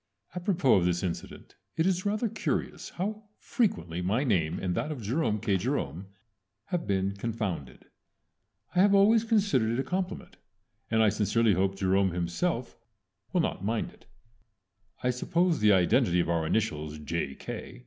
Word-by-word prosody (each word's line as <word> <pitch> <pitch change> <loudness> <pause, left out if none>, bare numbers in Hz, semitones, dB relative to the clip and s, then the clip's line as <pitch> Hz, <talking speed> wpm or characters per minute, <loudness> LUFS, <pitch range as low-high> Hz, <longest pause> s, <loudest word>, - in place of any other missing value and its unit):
Apropos 175 - +2
of 90 - +2
this 90 0 0
incident 90 -3 -5 0.2
it 160 - +2
is 185 +1 +1
rather 215 +3 0
curious - - -3
how 210 +4 -4
frequently 90 - -1
my 105 +9 +1
name 85 - +1
and 90 -2 -2
that 150 - -2
of 130 -7 -6
Jerome 110 -1 0
K. 100 -3 +1
Jerome 95 - -2 0.6
have 175 -2 -2
been 100 0 0
confounded. 100 - -4 0.9
I 180 - +1
have 200 +1 +5
always 215 +3 +5
considered 200 - +2
it 120 - -1
a - - +1
compliment, 185 +7 -4 0.5
and 110 0 +3
I 110 - +5
sincerely 110 +2 +2
hope 95 +2 +1
Jerome 95 -1 +2
himself 115 - -2 0.6
will 180 - +2
not 130 - -2
mind 110 +2 -1
it. - - -22 1.0
I 125 - +3
suppose 170 +6 +1
the 105 -1 +5
identity 90 -1 +3
of 85 - +1
our 80 -1 0
initials 75 -8 -1
J. 75 -2 -3
110 Hz, 155 wpm, -28 LUFS, -, 1.0 s, have